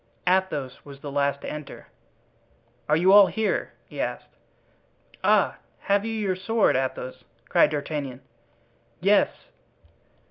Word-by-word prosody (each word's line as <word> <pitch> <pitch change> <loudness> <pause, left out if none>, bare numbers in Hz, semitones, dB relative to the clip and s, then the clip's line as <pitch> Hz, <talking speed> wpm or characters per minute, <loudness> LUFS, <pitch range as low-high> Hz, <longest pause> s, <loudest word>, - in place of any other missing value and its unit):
Athos 180 -8 0
was 140 -1 -12
the 145 - -6
last 140 0 0
to - - -7
enter. 150 -2 -8 1.0
"Are 150 - +5
you 185 +4 +5
all 200 -1 +9
here?" 220 -1 -1
he - - -6
asked. - - -5 0.9
"Ah! - - +3 0.2
have 200 0 +1
you 225 - -3
your 205 -4 -1
sword, 220 +4 +2
Athos?" 130 -1 -3 0.3
cried - - +5
D'Artagnan. 145 -3 -4 0.8
"Yes." 200 +4 +4
150 Hz, 120 wpm, -25 LUFS, 140-195 Hz, 1.0 s, all